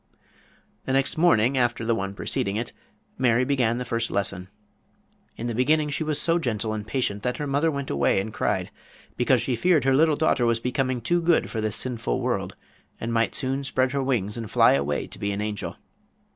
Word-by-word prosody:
The 130 - -1
next 135 0 +2
morning 135 -6 +3
after 120 -2 0
the 115 - +2
one 100 -2 -3
preceding 100 0 -2
it, 115 +2 -3 0.5
Mary 125 0 +3
began 125 -4 +1
the 125 - -4
first 115 -1 -1
lesson. 95 -2 -2 0.9
In 115 - -5
the 120 - -2
beginning 150 +5 +2
she 150 - -2
was 155 -1 0
so 170 0 +2
gentle 110 -6 -2
and 105 -1 -5
patient 105 -6 -1
that 125 +3 -2
her 150 - -3
mother 145 +3 +1
went 140 -3 -4
away 70 +6 +2
and 105 +3 -4
cried, - - -1 0.4
because 125 -1 +2
she 125 0 0
feared 165 +5 +3
her 135 - +3
dear 130 - +4
little 155 0 +4
daughter 145 -5 +2
was 115 0 +2
becoming 125 0 -1
too 175 +9 +1
good 170 0 +2
for 110 - -2
this 110 -2 -2
sinful 120 -3 -2
world, - - -2 0.4
and 115 +1 -3
might 115 0 +1
soon 135 0 -1
spread 130 -1 0
her 140 0 -1
wings 120 -6 -1
and 115 -2 -5
fly - - +5
away 70 +1 0
and - - -9
be 100 - -1
an 100 - -3
angel. 105 -1 -4
125 Hz, 210 wpm, -25 LUFS, 110-135 Hz, 0.9 s, fly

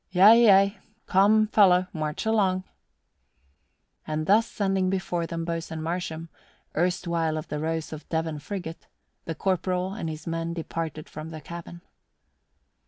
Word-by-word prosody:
"Yea, 210 +6 +7
yea. 195 0 +5 0.3
Come, 210 +3 +4
fellow, 185 -4 +5
march 155 +1 -3
along." 195 -4 +2 1.4
And 155 0 -2
thus 220 +5 +4
sending 195 -2 0
before 175 -3 -1
them 165 0 -4
Boatswain 165 -1 -4
Marsham, 165 -1 -3 0.5
erstwhile 170 -2 0
of 155 - -6
the 150 - -3
Rose 160 0 -3
of 155 - -10
Devon 160 -2 -2
frigate, 170 0 -7 0.4
the 165 - -4
corporal 185 +1 -1
and 185 -6 -4
his 155 -1 -7
men 165 0 -3
departed 160 -2 -5
from 155 +1 -8
the 160 -1 -7
cabin. 170 +2 -9
170 Hz, 135 wpm, -26 LUFS, 160-190 Hz, 1.4 s, Yea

